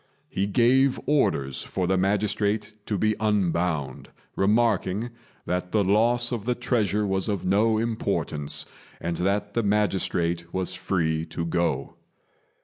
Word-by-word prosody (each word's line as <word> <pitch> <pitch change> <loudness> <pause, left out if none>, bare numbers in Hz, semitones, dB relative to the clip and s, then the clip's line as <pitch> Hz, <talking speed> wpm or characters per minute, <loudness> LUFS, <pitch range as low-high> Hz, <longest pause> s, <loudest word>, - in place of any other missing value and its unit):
He 100 +1 -1
gave 125 +5 +3
orders 70 - +1
for 95 +5 -2
the 95 +2 +2
magistrate 105 +2 0
to 105 - -1
be 110 +3 +1
unbound, 85 -9 0 0.3
remarking 105 +1 +1 0.3
that 90 0 -2
the 105 -2 +3
loss 120 +5 +2
of 115 -4 -3
the 125 0 +1
treasure 110 -4 0
was 95 0 0
of 100 -3 -2
no 110 +4 +3
importance, 110 -10 -1 0.3
and 85 0 -3
that 100 +3 0
the 115 - +1
magistrate 90 -5 0
was 95 0 -2
free 80 -4 -1
to 85 +1 -4
go. 85 +1 -1
100 Hz, 135 wpm, -25 LUFS, 90-110 Hz, 0.3 s, gave